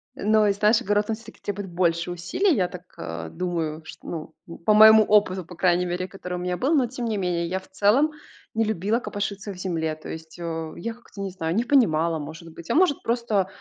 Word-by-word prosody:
Но 215 0 +3
и 200 - +4
знаешь, 215 +3 +3
огород 205 -2 +1
он 220 - +1
всё-таки 230 - -14
требует 200 -2 -4
больше 170 0 0
усилий, 300 - +1
я 180 -3 +2
так, 180 0 -10
а, 80 0 -6
думаю, 165 -3 -3
что, - - -11 0.4
ну, 170 - -9
по 215 - +5
моему 220 0 +9
опыту, 195 -4 +2
по 175 - -11
крайней 180 0 +2
мере, 180 +1 -2
который 180 -2 -7
у - - -2
меня 180 0 -2
был. 280 +6 +1
Но 265 -4 +4
тем 245 0 -5
не 220 -2 -1
менее, 175 -2 -1
я 185 +2 -2
в 190 - -18
целом 215 +11 +3 0.4
не 225 0 +1
любила 215 +2 0
копошиться 205 -2 -4
в - - -12
земле. 165 -4 -2
То 155 - -11
есть, 160 +1 -8
э, 165 -2 -4
я 230 +6 -4
как-то 225 -4 -12
не 195 - -2
знаю, 170 -2 -3
не 235 - +2
понимала, 170 - +3
может 160 +3 -9
быть, 165 0 -12
а - - +1
может 330 -4 +3
просто, 230 -5 0
190 Hz, 225 wpm, -24 LUFS, 170-215 Hz, 0.4 s, моему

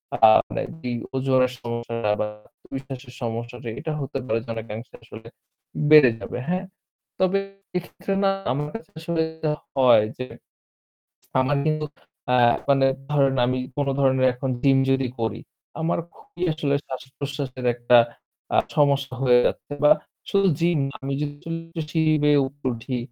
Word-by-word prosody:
আ - - -2 0.3
মানে - - -3 0.2
যেই 120 -1 -2 0.2
ওজনের 130 -1 +2
সমস্যা 115 -2 -2
বা - - +1 0.2
আত্মবিশ্বাসের 135 -2 -9
সমস্যাটা 120 +1 -4
এটা 155 +1 -4
হতে 135 0 -4
পারে 115 -2 0
যেন 115 - -6
অনেকাংশে 115 +1 -7
আসলে 110 0 -12 0.6
বেড়ে 150 -5 +9
যাবে। - - -6
হ্যাঁ, 185 +2 -1 0.5
তবে 185 +1 +3 0.4
এক্ষেত্রে 180 +2 -4
না 195 - +5 0.2
আমার 145 +3 -1
কাছে 225 - -8
আসলে 165 0 -1 0.2
যা 155 - +2 0.3
হয় 125 -5 +6
যে 125 - -4 1.2
আমার 135 +2 +2
কিন্তু 155 -1 0 0.5
আ - - +4 0.4
মানে 135 -1 +5 0.2
ধরেন 135 -2 +3
আমি 130 +1 0 0.2
কোন 145 - 0
ধরনের 130 -1 +4
এখন 130 +1 -3
জিম 135 -1 +5
যদি 135 -1 +2
করি 110 0 -2 0.4
আমার 165 +1 0 0.2
খুবই 175 - -12
আসলে 145 -3 0
শ্বাস-প্রশ্বাসের 135 0 -5
একটা 120 0 +4 0.6
আ - - +4 0.2
সমস্যা 140 -2 +2
হয়ে 125 -2 +6
যাচ্ছে - - -3
বা - - +7 0.4
শুধু 195 0 +3
জিম 170 -1 +2
না 140 - -9
আমি 135 0 -3
যদি 150 +3 -5 0.4
সিঁড়ি 160 -1 +3
বেয়ে 145 -1 +5
উপরে 140 -1 -5
উঠি 125 +2 -4
135 Hz, 150 wpm, -24 LUFS, 125-150 Hz, 1.2 s, বেড়ে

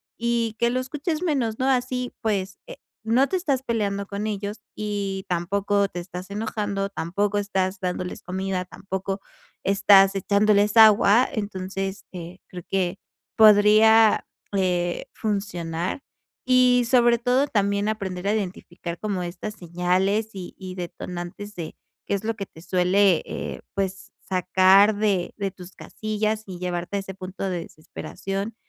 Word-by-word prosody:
y 230 -1 -1
que 235 0 +3
lo 255 - 0
escuches 300 +6 -3
menos, 255 -10 0
¿no?, 260 - 0
así 250 -1 0
pues, 195 -3 -2
eh, - - -9 0.3
no 240 +5 +3
te 375 - -2
estás 285 -8 0
peleando 205 -5 -1
con 205 +1 -3
ellos, 205 +1 -4
y 200 -2 -3
tampoco 200 +3 +1
te 175 - -6
estás 180 +1 -8
enojando, 205 -2 -2
tampoco 200 +3 -1
estás 195 -1 -1
dándoles 180 0 -3
comida, 185 0 -3
tampoco 195 +1 -5 0.4
estás 195 0 +6
echándoles 205 +2 +3
agua. 220 +2 +7
Entonces, 195 -2 -4
eh, 175 0 -8
creo 180 -1 -9
que 190 0 0 0.4
podría, 215 +1 +6 0.3
eh, 180 -2 0
funcionar 185 -2 -3 0.5
y 250 -1 +5
sobre 240 -2 +5
todo 250 +4 +2
también 200 -1 +1
aprender 195 -3 -3
a 205 - +2
identificar 175 -3 -5
como 200 -4 -2
estas 190 +5 -6
señales 185 +4 0
y 185 -2 -8
y 185 -1 -7
detonantes 180 +3 -7
de 165 -3 -6 0.3
qué - - -1
es 200 - -4
lo 225 0 -1
que 200 -2 -5
te 160 - -15
suele, 180 +1 +3
eh, - - -5
pues 195 -1 -3
sacar 190 +3 +4
de 205 -4 0
de 200 -1 -1
tus 180 -1 -12
casillas 215 0 -3
y 185 -2 -8
llevarte 180 +2 -3
a - - 0
ese 195 -1 -7
punto 190 0 -5
de 175 -2 -2
desesperación, 195 +7 -6
200 Hz, 145 wpm, -24 LUFS, 185-215 Hz, 0.5 s, agua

